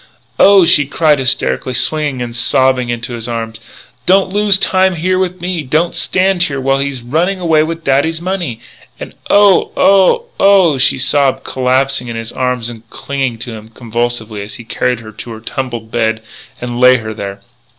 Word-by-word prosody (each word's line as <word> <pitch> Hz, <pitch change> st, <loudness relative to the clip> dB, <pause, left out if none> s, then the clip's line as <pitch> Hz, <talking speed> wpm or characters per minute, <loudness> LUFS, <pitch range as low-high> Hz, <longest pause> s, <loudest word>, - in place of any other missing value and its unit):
"Oh," 195 Hz, -2 st, +6 dB
she 145 Hz, -4 st, +4 dB
cried 150 Hz, 0 st, +2 dB
hysterically, 130 Hz, -, -1 dB
twisting 140 Hz, +1 st, +1 dB
and 120 Hz, -1 st, -7 dB
sobbing 130 Hz, 0 st, +1 dB
in 120 Hz, -1 st, -4 dB
his 120 Hz, -1 st, -4 dB
arms, 115 Hz, -1 st, -5 dB, 0.5 s
"don't 190 Hz, 0 st, +3 dB
lose 205 Hz, -1 st, +4 dB
time 190 Hz, -1 st, +1 dB
here 185 Hz, +3 st, 0 dB
with 185 Hz, -1 st, -2 dB
me! 175 Hz, -1 st, -3 dB
Don't 155 Hz, +5 st, 0 dB
stand 185 Hz, -1 st, 0 dB
here 140 Hz, -6 st, -1 dB
while 135 Hz, +1 st, 0 dB
he's 140 Hz, -3 st, -3 dB
running 170 Hz, +10 st, -1 dB
away 165 Hz, -3 st, +2 dB
with 165 Hz, +1 st, -4 dB
dad's 145 Hz, +4 st, +1 dB
money!" 175 Hz, -10 st, -4 dB, 0.4 s
And, -, -, -8 dB, 0.2 s
"Oh 205 Hz, -2 st, +4 dB
oh 195 Hz, -, +3 dB
oh!!" 190 Hz, -8 st, +4 dB
she 130 Hz, -, +3 dB
sobbed, 135 Hz, 0 st, +1 dB
collapsing 130 Hz, 0 st, 0 dB
in 115 Hz, -, -6 dB
his 115 Hz, 0 st, -5 dB
arms 125 Hz, -2 st, -2 dB
and 115 Hz, -1 st, -10 dB
clinging 135 Hz, -4 st, -4 dB
to 120 Hz, -, -8 dB
him 110 Hz, 0 st, -11 dB
convulsively 115 Hz, -2 st, -3 dB
as 100 Hz, +1 st, -8 dB
he 120 Hz, -, -9 dB
carried 125 Hz, +1 st, -2 dB
her 110 Hz, -1 st, -11 dB
to 110 Hz, +3 st, -10 dB
her 110 Hz, -, -9 dB
tumbled 120 Hz, -1 st, -6 dB
bed 110 Hz, -1 st, -1 dB, 0.4 s
and 120 Hz, 0 st, -5 dB
laid 125 Hz, -1 st, +5 dB
her 110 Hz, 0 st, -6 dB
there. 100 Hz, -1 st, -7 dB
130 Hz, 180 wpm, -14 LUFS, 120-170 Hz, 0.5 s, Oh